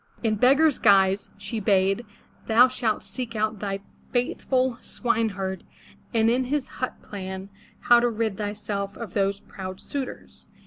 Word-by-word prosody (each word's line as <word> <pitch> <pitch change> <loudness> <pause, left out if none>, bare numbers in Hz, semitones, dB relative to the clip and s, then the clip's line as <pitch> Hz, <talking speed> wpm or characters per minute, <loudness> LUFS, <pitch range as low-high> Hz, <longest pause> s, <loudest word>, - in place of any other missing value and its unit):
"In 220 -2 +2
beggar's 275 +7 +4
guise," 195 -1 +4
she 205 +3 -4
bade, 195 +2 +2 0.4
'*thou 235 +3 +7
shalt 245 -4 -1
seek 245 -3 -5
out 215 0 0
thy 195 -1 -3 0.3
faithful 255 0 0
swineherd, 205 -5 -1 0.5
and 225 -2 +3
in 250 +3 +2
his 280 +1 -1
hut 255 - -2
plan 190 -1 -6 0.3
how 240 0 +6
to 240 0 +2
rid 220 -2 -1
thyself 205 -1 -3
of 230 -6 -7
those 200 0 0
proud 185 -1 -8
suitors." 275 -3 -6
215 Hz, 140 wpm, -25 LUFS, 195-245 Hz, 0.5 s, thou